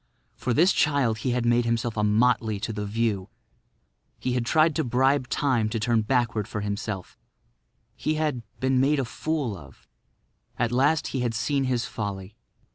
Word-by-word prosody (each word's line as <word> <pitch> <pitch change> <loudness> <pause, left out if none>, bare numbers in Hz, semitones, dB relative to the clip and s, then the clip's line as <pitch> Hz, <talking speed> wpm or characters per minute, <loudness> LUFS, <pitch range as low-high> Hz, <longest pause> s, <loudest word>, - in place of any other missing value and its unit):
For 125 - -3
this 170 - +4
child 135 -7 +2
he 130 - -2
had 120 -1 0
made 120 0 +3
himself 115 0 -1
a 105 - 0
motley 110 0 +2
to 115 -1 -3
the 105 -1 -4
view. 105 -2 -1 0.9
He 125 - -2
had 120 -2 -1
tried 155 +1 +3
to - - +1
bribe 130 +2 +2
Time 125 -7 +1
to 115 +1 -2
turn 115 +1 +2
backward 115 -2 0
for 110 -4 -4
himself; 100 -2 -4 0.8
he 155 - -1
had—been 130 -3 -1
made 140 +3 +3
a 135 - 0
fool 145 -3 -2
of. - - -15 0.7
At 120 -1 0
last 140 +5 +2
he 135 - -2
had 120 -2 -1
seen 140 +3 0
his 125 -2 0
folly. 100 -1 -5
120 Hz, 170 wpm, -26 LUFS, 110-135 Hz, 0.9 s, this